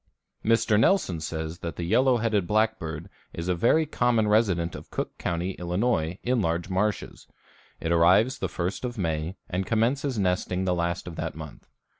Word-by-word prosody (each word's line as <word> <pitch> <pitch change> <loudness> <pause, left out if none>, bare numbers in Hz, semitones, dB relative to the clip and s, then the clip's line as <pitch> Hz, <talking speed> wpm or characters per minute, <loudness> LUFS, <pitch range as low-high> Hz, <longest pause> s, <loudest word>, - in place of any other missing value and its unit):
Mr. 110 -1 +3
Nelson 110 - +2
says 80 +2 -5
that 85 -2 -5
the 85 - -4
yellow 125 +8 +3
headed 110 -5 0
blackbird 95 -7 0 0.3
is 85 +1 -5
a 90 - +2
very 120 - +3
common 120 -6 +1
resident 95 -6 +2
of - - -9
Cook - - -4
County, 85 +2 -2
Ill., 85 -1 -5
in 110 +2 0
large 85 +1 -1
marshes. 105 +3 -2 0.5
It 80 - -2
arrives 90 +10 +4
the - - -2
first 90 +6 -3
of 120 -1 -4
May 80 -1 -2
and 90 +1 -2
commences 125 +4 +1
nesting 95 -1 0
the 90 - +2
last 85 +1 -1
of 85 - -7
that - - -4
month. - - -10
95 Hz, 170 wpm, -26 LUFS, 85-115 Hz, 0.5 s, arrives